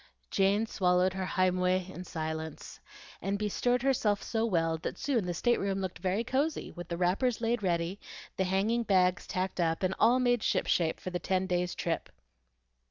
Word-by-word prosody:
Jane 200 +2 +3
swallowed 180 -3 +2
her 190 -1 -3
"heimweh" 185 0 +1
in 185 -1 -8
silence, 160 -1 -5 0.4
and 195 +2 -1
bestirred 245 +4 0
herself 225 -7 +1
so 225 0 0
well 165 -5 +1
that - - -5
soon 255 -9 0
the 175 - -1
stateroom 200 -2 +1
looked 190 -2 -4
very 190 +4 0
cosy 280 +6 -1
with 175 -1 -8
the 170 - -4
wrappers 195 +8 +1
laid 230 0 0
ready, 175 0 -1 0.4
the 190 - 0
hanging 200 +6 +1
bags 185 -4 +2
tacked 185 0 -2
up, 165 +1 +1
and 185 0 +1
all 240 +4 +5
made 245 -2 +2
ship - - +1
shape 165 -2 +1
for 185 - -6
the 175 - -2
ten 185 +1 0
days' 180 -1 -1
trip. 165 -1 -2
190 Hz, 175 wpm, -30 LUFS, 180-220 Hz, 0.4 s, all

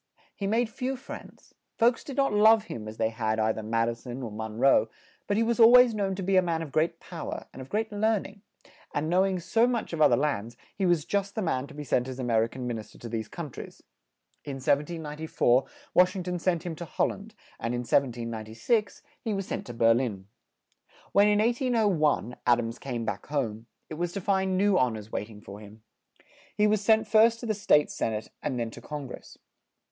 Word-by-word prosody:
He 200 - -3
made 230 +3 +2
few 255 +4 -3
friends; 265 - -11 0.2
folks 235 +1 +3
did 275 -2 -8
not 275 -5 +2
love 215 +1 +6
him 110 - -7
as 110 +1 -8
they 110 -1 +1
had 110 -1 -1
ei 110 0 +2
ther 110 - -6
Mad 115 +1 0
i 120 - 0
son 120 +2 -8
or 115 - -5
Mon 110 +1 -6
roe, 120 -3 +4 0.4
but 205 - +1
he 225 - +3
was 235 +1 0
al 225 0 +9
ways 250 -1 +7
known 195 -3 -1
to 190 - -4
be 190 +1 +2
a - - +7
man 165 -2 -1
of 150 - -8
great 165 +3 0
pow 170 -3 -7
er, - - -5
and 130 - -9
of 130 - -10
great 220 +1 -1
learn 215 0 +1
ing; 200 0 -12 0.5
and 155 +3 -1
know 185 +2 +4
ing 190 -1 0
so 225 +7 +2
much 235 -7 -2
of 160 - -2
other - - +6
lands, 120 -6 -2 0.2
he 195 -2 0
was 170 -4 +2
just 200 +1 -1
the 220 - -1
man 135 -6 -1
to - - -13
be 150 - -6
sent 125 -2 0
as 130 -1 -6
A 130 - -4
mer 115 -2 +2
i - - 0
can 125 +1 -7
Min 120 -2 -2
is 105 -1 -11
ter - - -17
to 120 - -8
these 110 -1 -4
coun 165 -5 -7
tries. - - -10 0.6
In 140 - -5
1794 150 -2 0 0.3
Wash 180 +2 +4
ing 185 - -3
ton 180 0 -3
sent 170 -2 0
him 170 -2 -4
to 170 - -6
Hol - - 0
land, 215 +2 -9 0.2
and 115 +2 -2
in 120 - -2
1796 115 - -1 0.2
he 220 -4 -1
was 195 -1 -3
sent - - -5
to 120 - -6
Ber 115 0 +5
lin. 115 -6 -2 0.9
When, 200 +1 +5
in 210 0 +3
1801, 210 - +1
Ad 120 -1 +6
ams 115 -1 -4
came 120 -4 -4
back - - -4
home, 115 -6 -3 0.2
it 155 - -8
was 175 0 -2
to - - -3
find 190 0 +1
new 200 0 +3
hon 125 -6 +1
ors 110 +1 -11
wait 105 - -3
ing 105 -2 -13
for 100 0 -10
him. 105 +1 -14 0.7
He 210 - +3
was 210 -1 +2
sent 220 +1 +3
first 225 +2 +5
to - - -5
the 220 - 0
State 150 -7 +3
Sen 110 - -2
ate 110 0 -5
and 130 -4 -2
then 115 -1 -2
to - - -11
Con 150 -2 -6
gress. 125 - -11
155 Hz, 240 wpm, -28 LUFS, -, 0.9 s, al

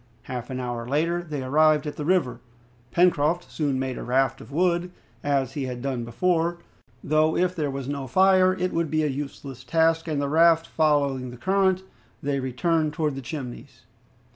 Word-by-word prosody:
Half 125 -1 -6
an 130 -1 -4
hour 120 -2 -4
later 165 +6 0
they 150 -5 -5
arrived 155 +2 +3
at 150 - -4
the 150 - -5
river. 175 -7 +1 0.5
Pencroft 170 +2 +2
soon 145 -4 -1
made 130 -1 -3
a - - -5
raft 130 +2 +1
of - - -13
wood, 175 +2 +1 0.3
as 135 -2 0
he 140 -3 -3
had 125 -1 -5
done 130 -4 -2
before, 170 +7 0 0.5
though 155 +1 +2
if 180 0 +1
there 150 -4 -1
was 135 -1 -5
no 140 -1 -4
fire 185 +5 +4
it 185 0 -2
would 165 -2 0
be 155 +1 +1
a - - +2
useless 135 -2 -6
task, 165 +4 +2
and 155 -3 -1
the 140 - 0
raft 165 +2 +4
following 140 -5 +1
the 120 - -10
current, 190 +4 +1 0.4
they 140 -1 0
returned 155 +4 0
towards 150 -3 -1
the 135 - -5
Chimneys. 130 -2 -8
150 Hz, 185 wpm, -25 LUFS, 135-170 Hz, 0.5 s, fire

